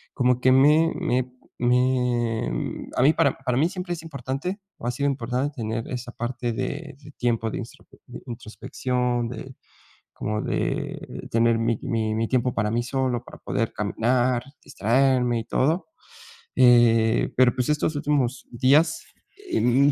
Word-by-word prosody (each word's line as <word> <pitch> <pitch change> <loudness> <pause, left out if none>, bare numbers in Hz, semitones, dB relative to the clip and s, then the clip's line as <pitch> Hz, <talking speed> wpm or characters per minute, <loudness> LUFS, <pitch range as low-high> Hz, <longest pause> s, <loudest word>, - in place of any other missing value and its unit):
como 125 -1 +2
que 130 - +5
me 150 +5 +5
me 125 0 0 0.3
me, 125 -2 +1
mm, - - -4
a - - +2
mí 140 - +6
para - - +2
para 125 -2 -1
mí 150 +5 +3
siempre 180 -1 -6
es 165 - -6
importante, 150 - -5 0.2
o 120 - -6
ha - - +1
sido 140 +4 0
importante 130 +2 -2
tener 115 0 -3
esa 120 -1 -5
parte 120 0 -3
de 145 +5 -4
de 145 +1 -14
tiempo 115 -2 0
de - - -4
instrope - - -10
de - - -9
introspección, 120 +1 -2
de 125 +2 -8 0.6
como 105 0 -3
de - - -3
tener 115 0 +3
mi 115 -1 +1
mi 110 -4 -1
mi 115 0 0
tiempo 125 -1 +1
para 105 -1 0
mí 120 +1 +1
solo, 125 -2 -1
para - - -12
poder 115 +1 -2
caminar, 120 +4 +1 0.2
distraerme 125 +1 +2
y 115 - -4
todo, 160 +7 0 0.7
eh, 115 -2 +4
pero 130 -1 +5
pues, 125 -1 -1
estos 150 +1 +1
últimos 140 -3 0
días, 140 +7 +3 0.5
em, 135 - +4
125 Hz, 155 wpm, -24 LUFS, 115-135 Hz, 0.7 s, mí